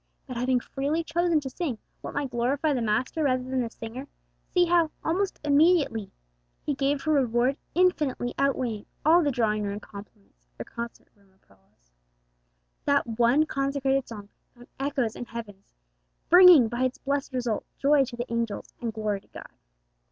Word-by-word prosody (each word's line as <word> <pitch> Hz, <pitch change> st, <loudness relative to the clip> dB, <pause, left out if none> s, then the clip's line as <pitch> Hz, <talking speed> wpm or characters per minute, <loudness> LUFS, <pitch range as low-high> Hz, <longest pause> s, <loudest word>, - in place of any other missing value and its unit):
But 255 Hz, -, -7 dB
having 250 Hz, +1 st, +1 dB
freely 285 Hz, +6 st, -2 dB
chosen 335 Hz, 0 st, +1 dB
to 270 Hz, -, -5 dB
sing 280 Hz, -5 st, -3 dB, 0.2 s
what -, -, -7 dB
might 280 Hz, -2 st, -2 dB
glorify 265 Hz, +6 st, 0 dB
the 255 Hz, -, -1 dB
Master 230 Hz, +8 st, 0 dB
rather 255 Hz, -3 st, +1 dB
than 260 Hz, 0 st, -1 dB
the 235 Hz, -, -3 dB
singer, 235 Hz, +4 st, -8 dB, 0.4 s
see 355 Hz, -1 st, +4 dB
how, 340 Hz, -2 st, +3 dB
almost 370 Hz, +4 st, -1 dB
immediately, 290 Hz, -, +3 dB, 0.6 s
He 295 Hz, -, 0 dB
gave 275 Hz, +1 st, 0 dB
her 310 Hz, -1 st, +2 dB
a 280 Hz, -, +4 dB
reward 245 Hz, +2 st, +1 dB, 0.2 s
infinitely 305 Hz, -9 st, +1 dB
outweighing 255 Hz, -6 st, -1 dB, 0.2 s
all 335 Hz, +3 st, +6 dB
the 295 Hz, -, +1 dB
drawing 220 Hz, -5 st, 0 dB
room 205 Hz, 0 st, -3 dB
compliments 200 Hz, -, -14 dB
or -, -, -6 dB
concert 235 Hz, 0 st, -8 dB
room 200 Hz, -1 st, -28 dB
applause! 95 Hz, -, -31 dB, 0.9 s
That 280 Hz, 0 st, +3 dB
one 245 Hz, +6 st, +4 dB
consecrated 275 Hz, -2 st, 0 dB
song 205 Hz, -3 st, -9 dB, 0.3 s
found 245 Hz, 0 st, -16 dB
echoes 270 Hz, -5 st, -1 dB
in 245 Hz, -, -6 dB
heaven, 225 Hz, -5 st, -8 dB, 0.7 s
bringing, 355 Hz, -8 st, +9 dB
by 240 Hz, +3 st, -1 dB
its 255 Hz, -, -2 dB
blessed 280 Hz, 0 st, -2 dB
result, 240 Hz, -4 st, -1 dB
joy 280 Hz, 0 st, +4 dB
to 245 Hz, -1 st, -8 dB
the 240 Hz, 0 st, -4 dB
angels 230 Hz, -3 st, -3 dB
and 235 Hz, -2 st, -2 dB
glory 210 Hz, -2 st, -2 dB
to -, -, -28 dB
God. -, -, -12 dB
255 Hz, 165 wpm, -26 LUFS, 230-290 Hz, 0.9 s, bringing